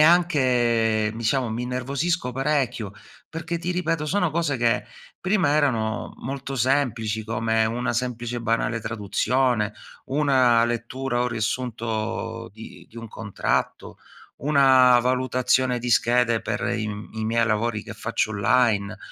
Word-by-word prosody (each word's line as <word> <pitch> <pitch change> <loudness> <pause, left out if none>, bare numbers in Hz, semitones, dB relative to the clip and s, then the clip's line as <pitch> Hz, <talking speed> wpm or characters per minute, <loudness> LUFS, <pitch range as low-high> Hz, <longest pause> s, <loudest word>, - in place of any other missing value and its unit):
anche 125 -10 +3
ehm, 110 - -7
diciamo 120 +2 0
mi 115 +2 -3
innervosisco 135 +5 -2
parecchio 135 -6 -1 0.4
perché, 165 +1 -4
ti 175 +1 -3
ripeto, 165 -3 -1
sono 180 -1 +1
cose 155 -4 0
che 120 +1 +1 0.4
prima 185 -4 +2
erano 115 -8 0
molto 135 +1 -5
semplici, 115 -4 0
come 110 0 0
una 120 +3 -1
semplice 120 0 -3
e 120 - -3
banale 115 0 0
traduzione, 110 +2 0 0.3
una 130 -5 +3
lettura 120 +2 -2
o 125 - +1
riassunto 115 -1 -3
di 110 +1 -12
di 115 - -18
un 115 -1 -8
contratto, 105 -2 -3 0.5
una 130 -3 +5
valutazione 130 0 +1
di 120 +1 -4
schede 120 -1 +3
per - - -3 0.2
i 110 - -2
m 105 0 -7
i 110 0 -3
miei 115 +1 +1
lavori 105 0 0
che - - -9
faccio 110 - -1
online. 105 -1 +1
120 Hz, 135 wpm, -24 LUFS, 115-135 Hz, 0.5 s, una